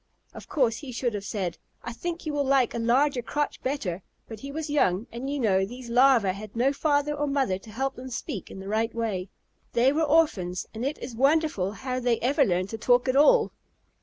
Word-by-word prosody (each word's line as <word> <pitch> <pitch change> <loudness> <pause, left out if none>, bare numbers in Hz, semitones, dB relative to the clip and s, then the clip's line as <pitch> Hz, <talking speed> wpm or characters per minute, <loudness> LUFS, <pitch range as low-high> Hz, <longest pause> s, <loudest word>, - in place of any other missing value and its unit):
Of - - -11
course 240 -6 +1
he 280 -4 -8
should 240 -1 -1
have 205 -1 -4
said, 195 -4 -3 0.2
"I 235 - -5
think 340 +7 -5
you 305 - -2
will 290 -1 +1
like 265 -3 +2
a 235 - -3
larger 250 +3 +2
crotch 295 +5 -2
better," 215 -10 -2 0.3
but 220 -2 -8
he 275 +4 -7
was 315 +2 -4
young, 220 -9 +1
and, 245 +4 -5
you 285 0 -2
know, 195 -6 +2
these 240 +4 -7
Larvæ 245 -6 +5
had 210 +2 -9
no 255 +4 +2
father 290 0 +1
or 295 0 -1
mother 270 -10 0
to 220 - -15
help 265 +6 -3
them 260 +1 -7
speak 235 - -5
in - - -9
the 190 - -8
right 220 +2 -1
way. 205 -5 -2 0.4
They 245 +3 +4
were 315 - +1
orphans, 295 - +2
and 225 +2 -5
it 280 +3 -1
is 245 - -7
wonderful 275 - +2
how 255 +2 -3
they 240 -2 +1
ever 280 +4 +3
learned 185 -4 0
to 225 - -6
talk 245 +3 +3
at 255 - +1
all. 445 - +5
250 Hz, 220 wpm, -26 LUFS, 215-285 Hz, 0.4 s, Larvæ